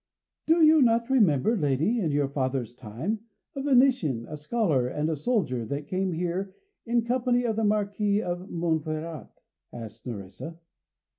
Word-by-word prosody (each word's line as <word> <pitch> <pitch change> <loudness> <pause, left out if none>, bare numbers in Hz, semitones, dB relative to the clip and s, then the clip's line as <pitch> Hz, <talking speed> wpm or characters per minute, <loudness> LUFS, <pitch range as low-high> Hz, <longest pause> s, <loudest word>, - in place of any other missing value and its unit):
"Do 325 +1 +5
you 310 0 +7
not 235 0 +3
remember, 210 - +3
lady, 155 - +1
in 175 -7 0
your 145 -1 +1
father's 130 -4 -2
time, 125 - -4 0.4
a 275 - -3
Venetian, 250 - +3
a 155 - -6
scholar 150 - 0
and 150 +5 -1
a - - 0
soldier, 150 - 0
that 145 +1 -4
came 185 +1 -1
here 180 +3 -3 0.3
in 235 0 +2
company 245 0 +1
of 225 -2 0
the 225 - 0
Marquis 205 0 +1
of 180 +2 -4
Monferrat?" 160 -4 -2 0.4
asked 115 0 -9
Nerissa. 115 - -7
175 Hz, 150 wpm, -27 LUFS, 140-230 Hz, 0.4 s, you